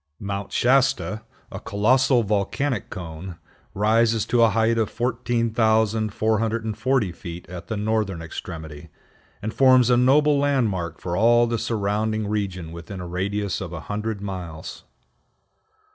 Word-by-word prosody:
Mount 100 0 -4
Shasta, 130 -3 +2 0.3
a - - -6
colossal 125 +5 +2
volcanic 105 +4 -1
cone, 85 +1 -7 0.4
rises 110 +1 +2
to 120 - +2
a 115 - +6
height 115 +1 +2
of 110 - +1
14,440 110 -1 0
feet 85 0 -9
at 90 -1 -9
the 110 - -3
northern 105 -3 -1
extremity, 80 -2 -8 0.5
and 110 +1 -3
forms 130 -2 +5
a 120 - +5
noble 145 +3 +4
landmark 115 -12 0
for 85 -1 -3
all 120 +4 +5
the 115 -1 -1
surrounding 110 -1 -1
region 95 -5 -3
within 85 +3 -8
a 90 - -6
radius 100 +3 -2
of 90 -3 -5
a 80 - -5
hundred 105 +2 -4
miles. 90 -5 -7
110 Hz, 130 wpm, -23 LUFS, 95-115 Hz, 0.5 s, a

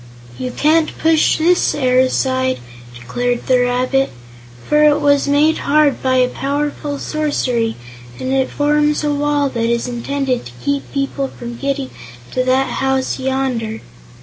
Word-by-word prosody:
"You 255 - -3
can't 310 +5 +1
push 320 -1 +3
this 350 +3 +2
air 255 -3 +2
aside," 260 0 +1 0.4
declared 240 - -2
the 255 -1 +3
rabbit, 250 +2 +1 0.6
"for 300 0 +4
it 295 -1 +5
was 285 0 +3
made 295 +3 +3
hard 295 -1 +2
by 255 -1 +3
powerful 285 +2 -3
sorcery, 255 -7 -1 0.4
and 260 +1 -2
it 265 -1 +1
forms 295 +1 +1
a 295 -1 +1
wall 290 0 +1
that 230 -2 -1
is 235 +1 0
intended 255 +1 -2
to 120 - -13
keep 280 0 -1
people 275 0 -2
from 240 -2 -8
getting 275 +1 -3 0.4
to 255 - 0
that 260 0 +2
house 265 0 0
yonder." 260 -4 -2
270 Hz, 145 wpm, -17 LUFS, 255-290 Hz, 0.6 s, it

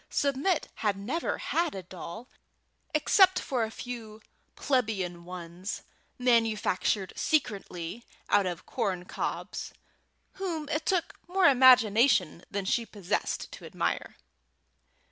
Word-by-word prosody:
Submit 285 +5 +1
had 205 -3 0
never 250 +13 -2
had 335 -5 0
a 190 - -5
doll, 185 +6 -8 0.6
except 365 +4 +5
a 235 -4 +1
few 225 -2 -7 0.4
plebeian 195 -10 -1
ones, 180 +2 -6 0.3
manufactured 220 -5 +1
secretly 205 - -1 0.2
out 200 -2 +3
of 175 -2 -5
corncobs, 180 -2 -3 0.7
whom 330 -6 -2
it 310 0 -2
took 360 -3 +1
more 370 +1 +2
imagination 240 - +5
than 200 -1 -3
she 235 +4 +1
possessed 205 -5 -3
to - - -10
admire. - - -2
225 Hz, 105 wpm, -29 LUFS, 190-280 Hz, 0.7 s, except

